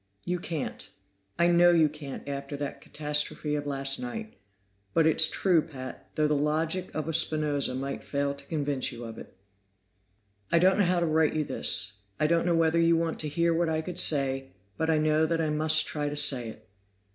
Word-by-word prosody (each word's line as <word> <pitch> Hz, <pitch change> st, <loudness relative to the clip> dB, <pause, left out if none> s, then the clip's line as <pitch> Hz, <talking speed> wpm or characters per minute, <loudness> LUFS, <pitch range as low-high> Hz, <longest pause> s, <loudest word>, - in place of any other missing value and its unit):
"You 180 Hz, 0 st, -1 dB
can't; 160 Hz, -5 st, -5 dB, 0.5 s
I 170 Hz, -, +3 dB
know 175 Hz, 0 st, +5 dB
you 165 Hz, -3 st, +5 dB
can't 145 Hz, -2 st, -8 dB
after 140 Hz, 0 st, -5 dB
that 145 Hz, 0 st, -5 dB
catastrophe 150 Hz, 0 st, -2 dB
of 145 Hz, -1 st, -2 dB
last 135 Hz, -1 st, -1 dB
night. 225 Hz, -3 st, -6 dB, 0.6 s
But 165 Hz, -, +4 dB
it's 160 Hz, -, +4 dB
true, 180 Hz, -4 st, +2 dB
Pat, 135 Hz, -5 st, -9 dB
though 155 Hz, -1 st, +2 dB
the 150 Hz, -, +1 dB
logic 160 Hz, +5 st, 0 dB
of 155 Hz, -1 st, -3 dB
a 165 Hz, -, -2 dB
Spinoza 150 Hz, -4 st, +1 dB
might 135 Hz, +1 st, -4 dB
fail 140 Hz, 0 st, -1 dB
to 140 Hz, 0 st, -13 dB
convince 145 Hz, -4 st, -1 dB
you 120 Hz, 0 st, -8 dB
of 115 Hz, -1 st, -8 dB
it. -, -, -13 dB, 1.1 s
"I 170 Hz, -, +5 dB
don't 185 Hz, +4 st, +4 dB
know 200 Hz, -, +4 dB
how 175 Hz, 0 st, +1 dB
to -, -, +2 dB
write 155 Hz, -1 st, +2 dB
you 155 Hz, -, +1 dB
this. 105 Hz, -7 st, +1 dB, 0.2 s
I -, -, +2 dB
don't 170 Hz, +2 st, +2 dB
know 170 Hz, -, +3 dB
whether 165 Hz, 0 st, +2 dB
you 165 Hz, 0 st, +4 dB
want 165 Hz, -1 st, -2 dB
to 155 Hz, -, -1 dB
hear 170 Hz, +3 st, +1 dB
what 165 Hz, 0 st, +1 dB
I 160 Hz, 0 st, 0 dB
could 180 Hz, +2 st, -3 dB
say, 135 Hz, -2 st, +2 dB, 0.3 s
but 160 Hz, 0 st, -1 dB
I 160 Hz, -, +3 dB
know 155 Hz, +1 st, +2 dB
that 165 Hz, 0 st, 0 dB
I 155 Hz, -2 st, 0 dB
must 155 Hz, +1 st, +3 dB
try 150 Hz, -1 st, -3 dB
to 145 Hz, -, -5 dB
say 135 Hz, -5 st, +1 dB
it. 110 Hz, 0 st, -13 dB
155 Hz, 205 wpm, -28 LUFS, 140-165 Hz, 1.1 s, know